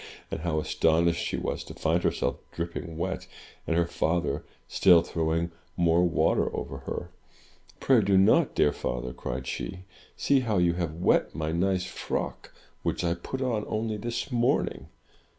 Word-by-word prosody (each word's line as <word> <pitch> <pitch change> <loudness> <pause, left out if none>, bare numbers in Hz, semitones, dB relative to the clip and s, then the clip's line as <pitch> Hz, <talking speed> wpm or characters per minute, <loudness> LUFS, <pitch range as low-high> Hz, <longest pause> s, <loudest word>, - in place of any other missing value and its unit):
— - - -22
and - - -2
how 80 -1 0
astonished 85 +2 +2
she - - -2
was - - -3
to - - -10
find 80 +2 +1
herself - - 0
dripping 85 -1 -5
wet, 95 +3 -3 0.4
and 85 - +1
her 85 - +3
father 85 -3 -1 0.2
still 90 -4 +6
throw 80 -2 -1
ing 85 +1 0 0.3
more 85 0 +4
water 85 -4 +2
over - - -5
her. - - -5 0.7
"Pray 130 -4 +4
do 100 -1 +3
not, 95 - +4
dear 75 - +4
father," 60 0 -3
cried 65 +1 -5
she. 65 +8 -5 0.3
"See 140 - +3
how 115 -5 0
you 90 -1 +3
have 85 -3 -2
wet 85 - +2
my 80 0 -2
nice 90 +2 +1
frock, - - -4 0.3
which - - -1
I 85 -1 +2
put 130 +10 -5
on 115 -5 0
only 110 0 -2
this 120 +5 -4
morning! 120 0 +1
85 Hz, 170 wpm, -28 LUFS, 80-95 Hz, 0.7 s, still